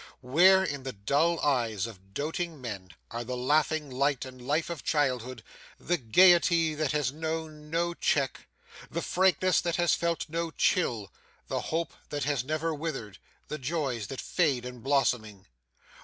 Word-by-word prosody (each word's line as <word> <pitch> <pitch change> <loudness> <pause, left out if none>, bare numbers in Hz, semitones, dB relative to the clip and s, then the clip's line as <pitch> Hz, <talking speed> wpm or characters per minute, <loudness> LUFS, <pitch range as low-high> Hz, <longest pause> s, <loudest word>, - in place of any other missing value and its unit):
Where, 180 +9 +6
in 145 -7 -3
the 130 -1 -5
dull 145 +11 +1
eyes 115 -8 +1
of 95 -3 -12
doating 160 +2 -3
men, 100 -7 -6 0.2
are 115 +1 -4
the 125 +1 -4
laughing 150 +3 +1
light 140 +1 0
and 130 -1 -11
life 150 +7 -1
of 165 -5 -6
childhood, 130 -5 0 0.4
the 175 - 0
gaiety 170 +4 +5
that 150 -2 -1
has 150 -4 0
known 155 0 -5
no 170 +2 0
check, 140 -5 0 0.4
the - - -3
frankness 185 0 +3
that 170 -1 -1
has 175 -1 +3
felt 170 -1 -1
no 165 +1 -2
chill, 120 - 0 0.4
the - - -1
hope 165 +1 -1 0.2
that 145 -1 -2
has 140 -3 0
never 155 +3 -1
withered, 145 - -5 0.3
the 150 - -5
joys 130 - -2
that 135 - -6
fade 140 -9 +1
in 125 -1 -7
blossoming? 115 -6 0
145 Hz, 155 wpm, -29 LUFS, 125-165 Hz, 0.4 s, Where